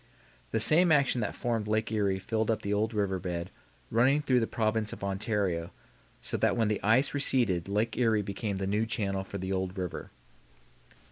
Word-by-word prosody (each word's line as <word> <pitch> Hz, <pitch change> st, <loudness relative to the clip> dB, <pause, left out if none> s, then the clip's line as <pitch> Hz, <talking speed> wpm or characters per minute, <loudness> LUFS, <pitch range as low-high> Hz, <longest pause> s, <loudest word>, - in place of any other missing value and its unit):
The 110 Hz, -, 0 dB
same 165 Hz, +9 st, +5 dB
action 140 Hz, -5 st, +3 dB
that 105 Hz, -, -3 dB
formed 115 Hz, -3 st, -2 dB
Lake 110 Hz, +1 st, 0 dB
Erie 100 Hz, -3 st, +1 dB
filled 110 Hz, +3 st, -2 dB
up 110 Hz, -, 0 dB
the 100 Hz, -, -1 dB
old 110 Hz, +2 st, 0 dB
river 100 Hz, -4 st, -1 dB
bed 90 Hz, -2 st, -4 dB, 0.4 s
running 130 Hz, +6 st, +4 dB
through 130 Hz, -4 st, +2 dB
the 115 Hz, -, 0 dB
province 110 Hz, -1 st, 0 dB
of -, -, -9 dB
Ontario, 95 Hz, -4 st, -1 dB, 0.5 s
so -, -, -2 dB
that -, -, +1 dB
when 110 Hz, -2 st, +2 dB
the 105 Hz, -, -1 dB
ice 115 Hz, +7 st, +3 dB
receded 120 Hz, -11 st, +1 dB
Lake 110 Hz, +3 st, 0 dB
Erie 110 Hz, -4 st, +2 dB
became 100 Hz, 0 st, -4 dB
the 95 Hz, -, -2 dB
new 105 Hz, +3 st, 0 dB
channel 100 Hz, -3 st, -1 dB
for 100 Hz, -, -7 dB
the 95 Hz, 0 st, -3 dB
old 95 Hz, 0 st, -3 dB
river. 90 Hz, -2 st, -5 dB
105 Hz, 190 wpm, -29 LUFS, 95-115 Hz, 0.5 s, same